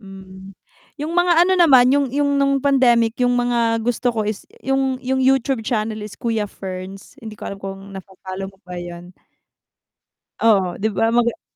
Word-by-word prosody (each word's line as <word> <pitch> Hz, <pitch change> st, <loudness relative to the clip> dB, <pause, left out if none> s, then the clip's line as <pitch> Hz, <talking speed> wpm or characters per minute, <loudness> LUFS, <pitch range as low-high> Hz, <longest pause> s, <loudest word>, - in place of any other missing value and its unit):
Hmm, 190 Hz, -1 st, -12 dB, 0.4 s
yung 305 Hz, +2 st, -4 dB
mga 350 Hz, -1 st, +4 dB
ano 375 Hz, -, +1 dB
naman, 260 Hz, -6 st, +6 dB
yung 285 Hz, 0 st, +2 dB
yung 285 Hz, +2 st, 0 dB
nung 275 Hz, 0 st, +2 dB
pandemic 250 Hz, -4 st, +2 dB
yung 245 Hz, 0 st, +2 dB
mga 235 Hz, -2 st, 0 dB
gusto 245 Hz, +1 st, 0 dB
ko 225 Hz, -3 st, -1 dB
is 210 Hz, -1 st, -5 dB, 0.2 s
yung 270 Hz, -1 st, 0 dB
yung 265 Hz, +1 st, 0 dB
YouTube 265 Hz, -1 st, +2 dB
channel 215 Hz, -1 st, -2 dB
is 210 Hz, -1 st, -8 dB
Kuya 225 Hz, -4 st, -2 dB
Ferns, 190 Hz, 0 st, -8 dB
hindi 220 Hz, -2 st, -9 dB
ko -, -, -10 dB
alam 200 Hz, 0 st, -6 dB
kung 195 Hz, 0 st, -8 dB
na-fo-follow 190 Hz, 0 st, -8 dB
mo 195 Hz, -, -17 dB
ba 180 Hz, 0 st, -7 dB
yun. 175 Hz, 0 st, -9 dB, 1.3 s
Oo 195 Hz, -6 st, +2 dB
'di 215 Hz, +3 st, 0 dB
ba 225 Hz, +3 st, +2 dB
maga 235 Hz, 0 st, +2 dB
a -, -, -29 dB
230 Hz, 175 wpm, -20 LUFS, 195-265 Hz, 1.3 s, naman